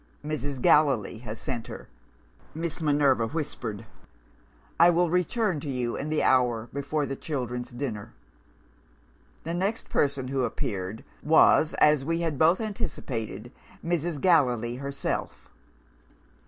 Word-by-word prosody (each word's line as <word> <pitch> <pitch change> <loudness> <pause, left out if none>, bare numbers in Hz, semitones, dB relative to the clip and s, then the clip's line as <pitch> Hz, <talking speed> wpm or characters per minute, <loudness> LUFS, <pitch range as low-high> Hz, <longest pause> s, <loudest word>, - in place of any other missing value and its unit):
'Mrs. 145 -3 -3
Gallilee 130 -7 +3
has 110 -2 -7
sent 120 -5 -4
her,' - - -9 0.7
Miss 165 +1 -3
Minerva 145 -6 +3
whispered; 115 -7 -4 0.9
'I 170 +1 +8
will 175 -1 +2
return 180 0 +1
to 145 - -6
you 125 -3 -2
in 150 - -4
the 155 - +1
hour 120 -3 +2
before 145 +2 -1
the 135 - -4
children's 125 -5 -4
dinner.' 120 -5 -5 1.3
"The 165 - -4
next 195 +6 -2
person 140 -2 0
who 135 -1 0
appeared 100 -2 -3 0.2
was, 155 0 +5
as 150 -2 +4
we 165 +3 -1
had 160 -5 -2
both 165 +3 +5
anticipated, 125 - -4 0.3
Mrs. 170 -2 -1
Gallilee 125 -9 +2
herself. 140 +1 -4
140 Hz, 125 wpm, -27 LUFS, 120-160 Hz, 1.3 s, I